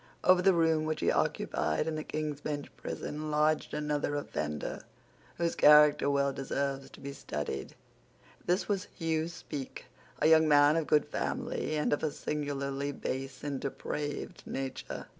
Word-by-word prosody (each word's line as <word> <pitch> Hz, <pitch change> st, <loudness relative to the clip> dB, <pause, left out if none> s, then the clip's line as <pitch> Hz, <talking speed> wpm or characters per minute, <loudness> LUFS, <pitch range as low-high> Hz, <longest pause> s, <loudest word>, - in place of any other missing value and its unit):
Over 185 Hz, 0 st, +6 dB
the 190 Hz, 0 st, +5 dB
room 160 Hz, -2 st, +3 dB
which 155 Hz, 0 st, -2 dB
he -, -, +3 dB
occupied 150 Hz, -, 0 dB
in 160 Hz, -, -2 dB
the 155 Hz, -, -3 dB
King's 150 Hz, -2 st, -3 dB
Bench 145 Hz, -1 st, -4 dB
prison 155 Hz, +1 st, -5 dB
lodged 150 Hz, +1 st, +2 dB
another 150 Hz, -1 st, -1 dB
offender 75 Hz, -, -3 dB, 0.6 s
whose 170 Hz, -1 st, 0 dB
character 150 Hz, -1 st, +6 dB
well 140 Hz, -1 st, +2 dB
deserves 135 Hz, 0 st, -2 dB
to -, -, -14 dB
be 140 Hz, 0 st, -6 dB
studied. 75 Hz, -, -5 dB, 0.7 s
This 180 Hz, +3 st, +1 dB
was 200 Hz, -2 st, -1 dB
Hugh 160 Hz, -2 st, 0 dB
Speke, 145 Hz, -5 st, -7 dB, 0.3 s
a -, -, 0 dB
young 160 Hz, 0 st, +6 dB
man 145 Hz, 0 st, +6 dB
of 165 Hz, -2 st, 0 dB
good 150 Hz, -1 st, +4 dB
family, 240 Hz, 0 st, -2 dB
but 150 Hz, -, +1 dB
of 145 Hz, -, 0 dB
a 155 Hz, -, +1 dB
singularly 140 Hz, -1 st, -3 dB
base 135 Hz, -1 st, -5 dB
and 140 Hz, -2 st, -2 dB
depraved 145 Hz, +2 st, -4 dB
nature. 135 Hz, -1 st, -5 dB
150 Hz, 155 wpm, -31 LUFS, 140-155 Hz, 0.7 s, Over